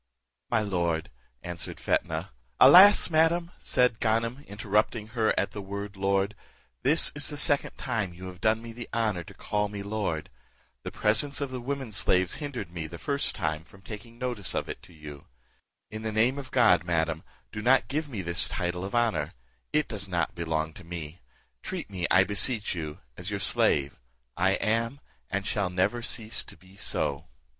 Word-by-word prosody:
"My - - +2
lord," 85 -5 -1 0.3
answered 85 -1 -5
Fetnah 80 +1 -1 0.3
"Alas! 195 0 +9
madam," 165 +2 +3
said 125 -3 +2
Ganem, 115 +4 0
interrupting 105 +1 0
her 115 -2 +1
at 100 - -1
the 105 - -6
word 100 +1 -6
lord, 95 +1 +1 0.5
"this 150 +6 +4
is 145 0 0
the 145 - -4
second 145 -1 +1
time 110 -8 -2
you 90 +2 -9
have 90 0 -9
done 110 +1 +2
me 115 -1 -8
the 120 0 -8
honour 105 -6 0
to - - -14
call 105 0 -1
me 100 -1 -6
lord; 100 -7 -3 0.5
the - - -5
presence 115 +7 +2
of 140 -2 -3
the 130 -1 -5
women 135 -2 -4
slaves 95 -3 +2
hindered 125 - -5
me 85 -2 -5
the 85 +2 -9
first 140 - -1
time 80 -4 -2
from 95 +3 -19
taking 110 +4 -9
notice 120 - -3
of - - -1
it - - -6
to - - -16
you: 75 -3 -11 0.6
in 110 0 -6
the 110 0 -3
name 120 +6 +2
of 135 -2 -8
God, 120 -10 +4
madam, 80 -2 0 0.3
do 105 - -5
not 125 +3 +4
give 150 +2 -2
me 105 -8 -4
this 85 +1 +2
title 90 0 -2
of 100 +4 -4
honour; 115 -11 +1 0.4
it 150 - +1
does 100 -3 -2
not 85 -4 0
belong 80 -2 -2
to 90 - -12
me; 85 -1 -8 0.4
treat - - -6
me, 90 -3 -1
I 95 - +6
beseech 105 +3 +3
you, 80 -4 -6 0.2
as 90 +2 -3
your 100 -1 -3
slave: 70 -7 +3 0.4
I 95 +2 +2
am, 115 +6 0 0.3
and 100 +1 -2
shall 100 -3 0
never 95 +7 0
cease 115 -1 0
to - - -12
be 95 +1 -19
so." 75 -7 -1
105 Hz, 185 wpm, -28 LUFS, 90-120 Hz, 0.6 s, Alas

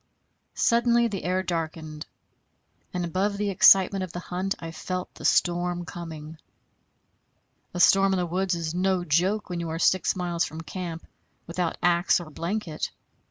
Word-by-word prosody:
Suddenly 235 0 +3
the 195 -3 -5
air 185 +1 0
darkened, 160 -3 -4 0.8
and 180 -1 -2
above 195 +4 -1
the 205 0 -1
excitement 195 +1 +6
of 185 - -6
the 175 - -5
hunt 185 +2 -3
I 165 -1 -7
felt 180 +2 -5
the - - -10
storm 175 0 +1
coming. 160 -2 -8 1.4
A - - -2
storm 195 +2 +5
in - - +1
the 180 - 0
woods 180 +1 -1
is 165 -1 -3
no 185 0 +1
joke 180 +6 +1
when 175 - -2
you 170 -1 -3
are 160 - -3
six 185 +2 +2
miles 175 -2 -1
from 160 +2 -5
camp 170 -1 -6 0.4
without 170 0 -2
axe 175 +1 +3
or 165 -3 -9
blanket. 170 0 -3
175 Hz, 160 wpm, -26 LUFS, 165-190 Hz, 1.4 s, excitement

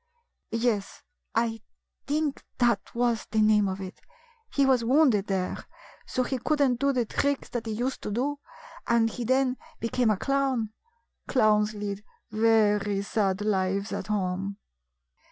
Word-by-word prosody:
" - - -52 0.2
Yes, 205 -4 -2 0.3
I 225 -1 0 0.5
think 295 0 -1
that 235 -5 +1
was 235 -2 0
the 220 - 0
name 210 -1 +4
of 190 0 -3
it. 190 -1 -8 0.5
He 280 - +3
was 260 -3 +3
wounded 245 -5 +4
there, 190 -2 -2 0.4
so 255 - 0
he 255 +1 -2
could 300 +5 0
n't 255 -4 +3
do 280 +1 +3
the 250 -3 0
tricks 280 +5 -1
he 225 - -4
used 245 +5 -2
to - - -4
do, 270 +7 -1 0.5
and 230 -1 +3
he 240 - -5
then 260 +1 +2 0.2
became 230 0 +1
a 210 - +2
clown. 265 -4 0 0.5
Clowns 215 -3 +3
lead 205 0 -4 0.3
very 210 -2 +3
sad 200 -2 0
lives 195 0 0
at 195 - -4
home." 195 -1 -2
225 Hz, 150 wpm, -27 LUFS, 205-255 Hz, 0.5 s, name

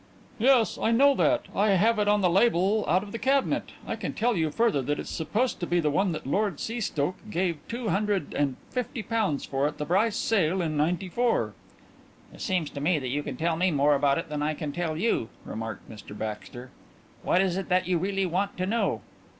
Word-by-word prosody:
"Yes, 245 -1 +3
I - - +2
know 275 +5 +5
that 300 +2 +2
I 205 0 +3
have 215 +4 +3
it 205 - +1
on 205 0 +3
the 180 - +3
label 200 +1 +3
out 185 +4 +3
of 205 - -10
the 230 - -5
cabinet. 270 +1 +1
I - - -3
can - - -4
tell 235 +1 +1
you 160 -3 +1
further 220 -4 +1
that 145 +3 -1
it's - - -6
supposed 215 +10 -1
to 175 - -3
be 175 0 +2
one 170 +5 +1
that 155 - -6
Lord 195 +4 0
Seastoke 210 -4 -3
gave 175 -4 -1
two 235 -1 -3
hundred 200 -5 0
and 140 -3 0 0.2
fifty 250 -2 -3
pounds 215 -11 -1
for 135 +1 0
at 150 - -5
the 150 - -3
Brice 200 +7 +2
sale 190 -4 +1
in 160 -3 -1
'94." 180 +10 0 0.8
"It - - -12
seems 180 -7 -1
to 140 - -6
me 165 +3 +2
that 130 -3 -3
you 145 +3 -1
can 140 -3 -6
tell 165 +2 0
me 180 +3 +2
more 145 -2 +3
about 140 0 +2
it 165 - -3
than 150 -1 -4
I 155 +1 0
can 150 0 -4
tell 160 0 -2
you," 180 - 0 0.2
remarked 110 -2 -6
Mr 105 -1 -10
Baxter. 110 +4 -6 0.5
"What 180 - +2
is 190 -2 +2
it 195 0 -4
that 180 -1 +2
you 180 -2 +1
really 195 +2 0
want 190 +3 -1
to 185 - -1
know?" 230 +5 0
180 Hz, 215 wpm, -27 LUFS, 150-215 Hz, 0.8 s, know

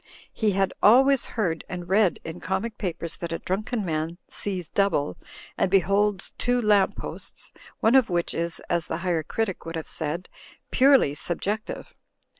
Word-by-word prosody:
He 215 -3 +1
had 195 0 +1
always 265 +4 +6
heard, 170 -7 0
and 175 -1 -5
read 195 -2 +3
in 165 +2 -7
comic 190 +5 -3
papers, 170 -4 -4
that 170 -1 -5
a 165 - -1
drunken 210 +3 -2
man 160 0 -2
"sees 185 -5 -4
double" 150 - +1 0.4
and - - +3
beholds 195 +1 +2
two 245 +1 +2
lamp 210 -4 +3
posts, - - -7 0.3
one 225 - +4
of 260 -5 +5
which 175 -1 0
is 170 0 -2
(as 170 -2 0
the - - -2
Higher 170 -3 +1
Critic 190 +4 -3
would 165 0 -6
have 160 - -4
said) 160 +3 -3 0.4
purely 265 - +5
subjective. 200 +7 -3
190 Hz, 160 wpm, -25 LUFS, 170-215 Hz, 0.4 s, always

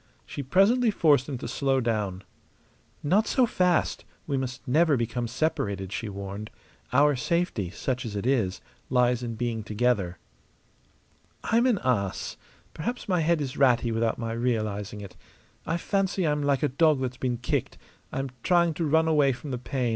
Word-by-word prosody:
She - - -6
presently 200 - +3
forced 150 -9 +3
him 135 - -3
to - - -6
slow 135 -1 +1
down. 105 -6 -1 0.8
"Not 190 +9 +3
so 255 - +3
fast! 180 -6 +1 0.2
We 140 - -2
must 130 -1 -4
never 150 +2 +4
become 120 +1 -2
separated," 100 - -2
she 110 - -3
warned. 100 +2 -6 0.4
"Our 145 +3 +4
safety 125 - -1
such 125 +7 -3
as 110 -4 -6
it 100 - -3
is 115 -8 +1 0.3
lies 125 -1 +2
in 115 -2 -4
being 115 -1 -2
together." 105 -5 0 1.3
"I'm 235 +3 +3
an 240 -5 +3
ass. 100 -7 -1 0.4
Perhaps 240 +11 -4
my 180 -3 +2
head 165 0 +2
is 135 -3 -4
ratty 120 -3 +3
without 115 0 0
my 115 -1 -3
realizing 110 -4 -2
it. 100 -2 -10 0.5
I 165 - 0
fancy 195 0 0
I'm 150 -1 +1
like 140 -1 +1
a - - +4
dog 150 +2 +3
that's 130 -1 -3
been 125 -2 -1
kicked; 120 - -2 0.3
I'm 135 -1 -3
trying 170 0 +3
to 165 +2 -2
run 160 +2 +3
away 145 -4 +4
from 135 +3 -8
the 125 - -3
pain. 125 -1 -2
130 Hz, 170 wpm, -27 LUFS, 115-155 Hz, 1.3 s, never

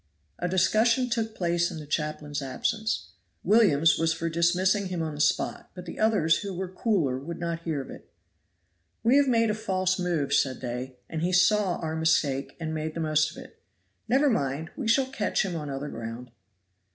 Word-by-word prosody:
A 175 - -1
discussion 225 +7 +2
took 225 -1 -1
place 175 -1 +1
in 175 - -7
the 155 - -8
chaplain's 150 -1 -3
absence. 220 - -2 0.3
Williams 165 -8 +4
was 165 0 +2
for 165 +1 -3
dismissing 185 +4 +2
him 180 -3 -3
on 155 -1 -3
the 145 - -4
spot, 150 - 0
but 180 -1 -8
the 170 - -8
others 210 -8 +3
who 200 -2 -5
were 190 +1 -3
cooler 180 - 0
would 165 +5 -6
not 170 -1 -3
hear 160 -4 -2
of - - -10
it. - - -13 0.9
"We 240 +5 +5
have 285 -1 +4
made 230 -3 +3
a - - 0
false 185 -3 -1
move," 170 -6 -1
said 130 -2 +2
they, 125 +1 -5
"and 160 - -4
he 175 +2 0
saw 185 0 +3
our 160 -1 -4
mistake 155 -4 +1
and 160 -1 -3
made 155 0 -3
the - - -3
most 155 -1 +2
of 155 - -13
it. - - -19 0.5
Never 275 +4 +3
mind! 145 - -2
we 255 - -4
shall 260 +4 +4
catch 240 -6 -1
him 180 -3 -3
on 150 -3 -4
other 140 +2 -4
ground." 115 +1 -7
170 Hz, 195 wpm, -27 LUFS, 155-205 Hz, 0.9 s, We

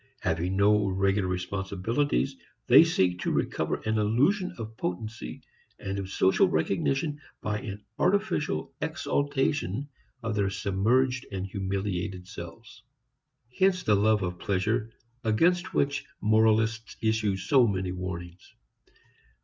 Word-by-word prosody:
Having 85 +4 -1
no 105 0 +4
regular 95 0 +1
responsibilities, 100 +10 -1 0.3
they 130 +6 +8
seek 95 - +1
to - - -1
recover - - -1
an 110 0 0
illusion 140 - +2
of 110 -1 -7
potency 90 - -5 0.3
and 100 0 -4
of 95 -1 -5
social 95 0 +3
recognition 135 - 0 0.2
by 105 0 -2
an 105 -4 -7
artificial 180 - 0
exaltation 140 - -1 0.4
of 115 -1 -1
their 100 -2 +1
submerged 120 +7 +1
and 95 -1 -3
humiliated 95 -1 -3
selves. 85 -4 -10 0.7
Hence 185 -1 +2
the 105 - +3
love 105 0 +3
of 90 -1 -3
pleasure 105 +3 0 0.3
against 170 +12 +2
which 140 0 +1 0.2
moralists 110 +1 +2
issue 110 -3 +1
so 125 +6 +4
many 95 -3 -1
warnings. 90 -1 -7
105 Hz, 115 wpm, -28 LUFS, 95-125 Hz, 0.7 s, they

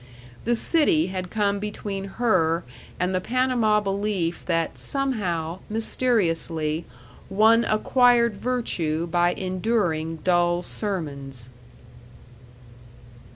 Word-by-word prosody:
The 240 +1 +2
city 225 - +3
had 185 -1 -4
come 205 -1 0
between 205 -1 -5
her 170 -8 +2 0.4
and 180 +1 0
the 185 - 0
Panama 245 -3 +2
belief 195 -4 -2
that 165 -2 -1
somehow, 185 - -2
mysteriously, 170 -9 0 0.4
one 220 +4 +4
acquired 235 +1 +3
virtue 175 -10 -1
by 175 +1 +2
enduring 185 -4 -1
dull 175 -1 +2
sermons. 140 - -5
190 Hz, 90 wpm, -24 LUFS, 165-225 Hz, 0.4 s, one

